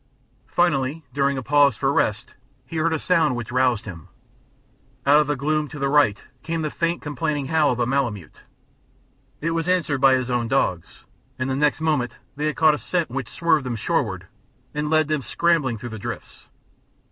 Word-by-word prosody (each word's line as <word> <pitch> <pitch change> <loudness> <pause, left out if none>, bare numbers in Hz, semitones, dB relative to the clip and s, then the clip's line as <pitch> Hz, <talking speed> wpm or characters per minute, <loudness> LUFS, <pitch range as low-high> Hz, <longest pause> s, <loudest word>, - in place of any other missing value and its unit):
Finally, 155 -3 0
during 140 0 +1
a 130 - -4
pause 145 +2 +4
for 135 0 0
rest 110 0 0 0.3
he 165 - -6
heard 165 +1 +1
a 160 - +1
sound 160 -5 +2
which 120 -1 -5
roused 125 -3 +1
him. 85 -6 -9 1.0
Out 145 +2 +6
of 150 - +1
the 145 - 0
gloom 150 +3 0
to 145 - -9
the 140 -1 0
right 135 -7 +3 0.2
came 165 +2 -3
the 155 - -2
faint 170 0 -1
complaining 150 -2 -2
howl 155 -2 +3
of 125 - -3
a 120 - +2
malemute; 120 - -2 1.0
it 165 +2 -1
was 165 +1 -1
answered 170 -7 +1
by 135 -1 +6
his 130 -1 -2
own 120 -1 0
dogs, 95 -9 -1 0.3
and 130 +1 -2
the - - 0
next 150 +2 +1
moment 150 -6 0 0.2
they 150 +2 -1
had 155 - -1
caught 160 -1 +5
a 150 - -3
scent 175 -7 -2
which 130 -3 -4
swerved 165 -3 +1
them 125 -2 -3
shoreward 110 - -1 0.5
and 150 0 -2
led 155 -1 +3
them 155 -2 0
scrambling 150 -5 +1
through 120 +3 -7
the 110 -1 -7
drifts. - - -8
145 Hz, 195 wpm, -23 LUFS, 130-155 Hz, 1.0 s, Out